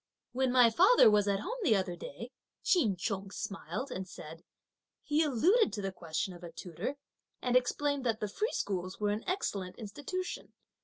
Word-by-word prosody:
"When 260 +1 +1
my 245 -2 +6
father 370 - +7
was 205 -1 +3
at 200 0 +1
home 485 - -4
the 265 - +4
other 185 -3 -1
day," 220 - -8 0.3
Ch'in 240 - +3
Chung 195 +1 -3
smiled 225 +6 -5
and 185 0 -4
said, 165 0 -10 0.6
"he 300 +1 +2
alluded 315 - +3
to 210 - -3
the 195 - -2
question 175 +1 -3
of 175 0 -13
a 170 - -7
tutor, 175 - -5 0.4
and 250 -1 0
explained 280 +2 +1
that 225 -1 0
the 210 - -2
free 430 - -2
schools 185 -2 -3
were 205 -1 +1
an 210 +2 -2
excellent 195 - -2
institution. 290 - -5
215 Hz, 175 wpm, -32 LUFS, 190-280 Hz, 0.6 s, father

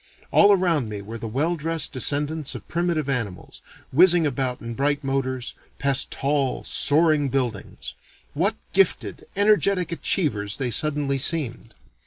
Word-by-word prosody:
All 205 0 +6
around 170 - +1
me 105 -1 -6
were 115 +3 -8
the 115 - -6
well 145 +10 -1
dressed 165 -1 0
descendants 145 +3 0
of - - -10
primitive 170 -3 -1
animals, 115 -9 -4 0.3
whizzing 175 +2 +5
about 130 -2 -1
in 115 0 -7
bright 145 +3 -1
motors, 130 -2 -3 0.2
past 135 -1 +2
tall, 140 -2 -1
soaring 150 -1 +2
buildings. 125 -6 -4 0.4
What - - 0 0.2
gifted, - - 0
energetic 200 -3 +2
achievers 110 - 0
they 130 -3 -2
suddenly 145 +1 0
seemed! 125 -6 0
140 Hz, 135 wpm, -23 LUFS, 125-165 Hz, 0.4 s, All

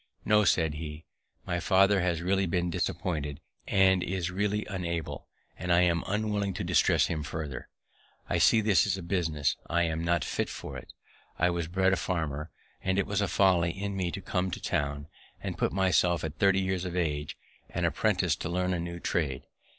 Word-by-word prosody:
"No," 105 -1 +4
said 80 -3 +2
he, 75 0 -7 0.4
"my 90 - -1
father 95 +2 +4
has 85 -2 0
really 95 +1 +1
been 85 0 0
disappointed, 75 -5 -2 0.3
and 95 -1 +4
is 90 0 -2
really 105 +2 -1
unable; 85 -4 -4 0.3
and 90 -1 -2
I 85 0 +5
am 85 -1 +2
unwilling 105 -1 -1
to - - -3
distress - - +3
him 80 -2 -2
farther. 75 -2 -5 0.6
I 85 - 0
see 110 +6 +5
this 105 -1 +3
is 95 -1 0
a 95 - -7
business 80 -5 0
I 85 +1 +2
am 80 -1 -1
not 85 -2 +1
fit - - -2
for. - - -7 0.6
I 90 +1 +3
was 85 -2 -2
bred 95 +2 +2
a - - +2
farmer, 80 -4 -2 0.3
and 95 0 0
it 100 - +2
was 100 0 -1
a 100 - +1
folly 90 -3 +3
in 100 +3 -4
me 95 -2 -1
to 100 - -4
come 95 -3 -1
to - - -5
town, 70 0 -2 0.3
and - - -4
put - - 0
myself, 90 -2 +2
at 80 -2 -5
thirty 95 -1 +4
years 95 -1 -1
of 90 -1 -4
age, 75 -4 -2 0.3
an - - -1
apprentice - - +1
to 85 - -4
learn 90 +1 0
a 90 - -1
new 85 0 -5
trade. 75 -7 -1
90 Hz, 190 wpm, -29 LUFS, 80-95 Hz, 0.6 s, I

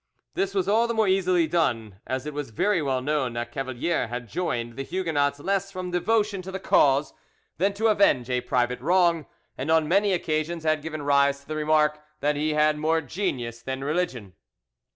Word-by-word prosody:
This 195 +1 -2
was 190 -2 +1
all 225 +3 +3
the 235 - -2
more 220 -2 +2
easily 185 -3 +3
done, 115 - -1
as 130 +1 -3
it 150 - -5
was 145 -2 -4
very 185 - +1
well 130 -3 -1
known 145 -4 0
that 120 0 -4
Cavalier 135 +2 -2
had 120 0 -6
joined 120 - -3
the 135 - -4
Huguenots 145 -3 -1
less 195 +4 -1
from 185 -1 -5
devotion 205 +2 +1
to 190 +1 -8
the 190 - -4
cause 140 -5 +3 0.5
than 200 +2 +1
to 220 +2 -2
avenge 200 - +3
a 125 -1 0
private 125 0 0
wrong, 170 0 +2 0.3
and 135 +4 -3
on 160 -1 +3
many 200 +4 +3
occasions 165 -1 -1
had 155 -1 +1
given 155 -1 -5
rise 140 0 +3
to 140 - -25
the 155 - -4
remark 150 0 +2 0.2
that 145 +1 +1
he 150 +1 0
had 150 0 +3
more 160 +1 +1
genius 125 - -3
than 130 +2 -4
religion. 135 - -2
155 Hz, 195 wpm, -25 LUFS, 135-185 Hz, 0.5 s, all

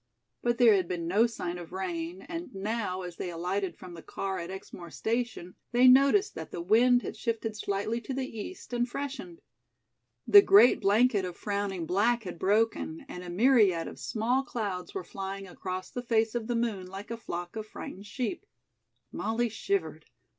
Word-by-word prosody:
But 240 0 +1
there 235 -3 +7
had 190 -3 +2
been 170 -2 -3
no 210 +7 +4
sign 180 -6 -5
of 170 - -10
rain, 180 -1 -4
and 335 - -7
now, 195 -2 -2
as 180 -1 -8
they 180 - -4
alighted 180 +3 -2
from 180 -1 -10
the 165 - -9
car 190 +2 -4
at 170 0 -6
Exmoor 185 -2 -8
station, 225 -4 -3 0.2
they 250 +2 +6
noticed 275 +11 +6
that - - -7
the - - -6
wind 240 +7 +4
had - - -5
shifted 225 -2 -2
slightly 210 +3 -2
to 265 - -5
the 265 -1 -1
east 245 - -8
and 240 0 0
freshened. 285 +7 -6 0.8
The 405 - +9
great 395 -10 +6
blanket 210 +1 +3
of 180 -2 -5
frowning 200 -4 -2
black 225 +7 +2
had 180 -4 -7
broken, 225 +10 +1
and 180 -9 -7
a 180 - -7
myriad 200 -4 +4
of - - -9
small 235 +4 0
clouds 205 - -4
were 385 - -3
flying 195 -2 -6
across 185 0 -6
the 245 - -4
face 225 -2 +1
of 235 -2 -3
the 240 - 0
moon 220 -6 -1
like 195 +4 -8
a - - -1
flock 175 -5 -6
of 215 -1 -5
frightened 200 -1 -8
sheep. 280 - -4 0.6
Molly 230 +2 -1
shivered. 160 -7 -2
210 Hz, 180 wpm, -29 LUFS, 185-240 Hz, 0.8 s, The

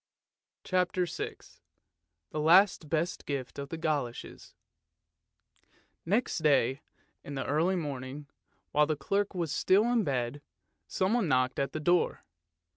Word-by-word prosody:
" - - -63
CHAPTER 180 0 +1
VI 170 - -5 1.0
THE 155 - -3
LAST 170 0 +5
BEST 165 +3 -1
GIFT 140 -2 -4
OF 140 0 -6
THE 165 - -5
GOLOSHES 145 -7 -4 1.5
Next 215 +4 +1
day 140 -3 +2 0.4
in 145 - -7
the 135 - -3
early 165 +6 +1
morning, 140 -3 -5 0.5
while 150 0 +3
the 155 - 0
clerk 200 +8 -1
was 170 -4 -2
still 190 +6 +3
in 235 -3 +3
bed, 130 -2 -2 0.5
someone 195 +2 +1
knocked 130 -2 +1
at 140 - -1
the 155 - -3
door. 175 +3 +1
155 Hz, 130 wpm, -30 LUFS, 140-180 Hz, 1.5 s, LAST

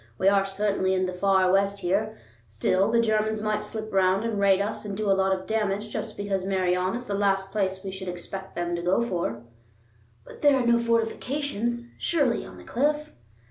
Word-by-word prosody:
We 190 - +1
are 195 -1 +3
certainly 195 -1 0
in 185 0 +1
the 185 - -3
far 190 0 +3
West 200 +1 +2
here; 215 +5 0 0.3
still, 185 - +1
the 230 +1 +3
Germans 215 -1 +1
might 215 -1 0
slip 220 -1 -6
round 190 +1 +3
and 220 -3 -1
raid 195 -1 +4
us 210 +1 -2
and 200 -2 -5
do 210 -2 +1
a - - +6
lot 190 0 +2
of 185 0 -1
damage 215 -1 -1
just 220 -1 -4
because 200 -2 -2
Meirion 185 0 0
is 245 +1 -5
the 205 - -4
last 195 -1 +1
place 190 -2 -1
we 195 - -4
should 190 0 -7
expect 190 +2 -6
them 175 0 -1
to 170 - -3
go 180 +6 +2
for." 170 - -3 0.8
"But - - -13
there 290 -2 +5
are 250 - 0
no 235 0 +4
fortifications, 235 +1 -1
surely, 280 -8 +1
on - - -11
the - - -12
cliff?" 295 +4 -1
200 Hz, 205 wpm, -26 LUFS, 190-220 Hz, 0.8 s, a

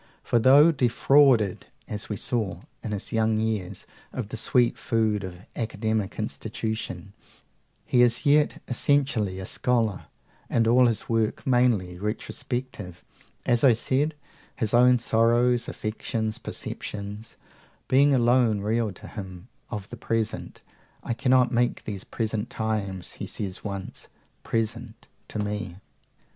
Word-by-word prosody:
For 120 - +2
though 140 +7 +7
"defrauded," 130 - +3 0.2
as 105 -1 -5
we 105 - -2
saw, 100 -5 -2 0.2
in 110 - -5
his 100 -2 -4
young 110 -1 +2
years, 110 -5 -2 0.3
"of - - -5
the - - -5
sweet 120 -2 +2
food 110 -3 0
of 90 -1 -8
academic 110 -2 -2
institution," 100 -4 -4 0.7
he 125 - +3
is 120 -1 +3
yet 145 +1 +3
essentially 125 -7 +1
a 95 - -5
scholar, 115 -5 0 0.4
and 115 - +2
all 125 +2 +6
his 115 -3 -1
work 115 -2 0
mainly 115 -9 +2
retrospective, 105 -2 -5 0.4
as 120 -1 +2
I 130 -4 +7
said; 140 +7 0 0.4
his 110 -5 -2
own 125 +1 +6
sorrows, 120 +1 +2
affections, 110 +1 -3
perceptions, 105 +1 -6 0.5
being 140 +2 +5
alone 120 -3 +3
real 110 +1 0
to - - -12
him 95 0 -9 0.2
of 105 -4 -5
the 120 - -7
present. 115 0 -3 0.4
"I 120 - -2
cannot 125 +1 +3
make 120 0 +1
these 100 -3 -5
present 110 0 -3
times," 100 -5 -3
he - - -7
says 95 -2 -5
once, 100 -2 -6 0.3
"present 115 0 -3 0.2
to - - -7
me." 105 -3 -3
115 Hz, 130 wpm, -26 LUFS, 105-120 Hz, 0.7 s, though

